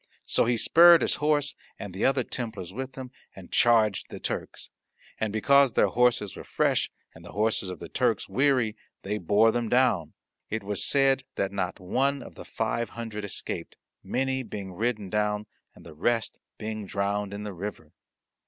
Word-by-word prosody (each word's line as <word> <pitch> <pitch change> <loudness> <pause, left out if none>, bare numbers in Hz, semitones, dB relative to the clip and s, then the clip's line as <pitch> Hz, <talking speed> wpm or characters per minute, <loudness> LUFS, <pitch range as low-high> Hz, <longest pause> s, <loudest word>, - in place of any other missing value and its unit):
So - - +2
he 120 0 +1
spurred 170 +7 +7
his - - +1
horse, 145 -1 +2 0.2
and 100 -3 -7
the 95 - -1
other 135 -1 +3
Templars 110 -8 -6
with 130 +3 -6
him, 130 -2 -8 0.2
and 95 -2 -12
charged 110 -4 +3
the - - -8
Turks. - - -5 0.5
And 110 -1 -1
because 140 +4 +4
their - - +3
horses 120 -5 +2
were - - -8
fresh - - +1 0.2
and 85 - -14
the 85 - -11
horses 105 -2 0
of 90 - -6
the - - -8
Turks - - 0
weary, 130 -5 +2 0.3
they 105 +2 -2
bore 105 +5 +4
them 120 -1 -1
down. 115 - +2 0.4
It 110 0 -3
was 100 0 -1
said 135 -1 +3
that 95 - -1
not 95 -2 -3
one 135 +9 0
of - - -11
the - - -10
five 115 0 -2
hundred 110 -3 -5
escaped, 100 - -4 0.3
many 130 0 -1
being 100 -6 -7
ridden 105 -1 -2
down, 105 0 0 0.3
and - - -16
the 80 - -11
rest 115 +8 0 0.2
being 110 -1 -5
drowned 100 +1 -1
in 100 +1 -6
the 105 -1 -5
river. 100 +4 -7
110 Hz, 180 wpm, -27 LUFS, 100-125 Hz, 0.5 s, spurred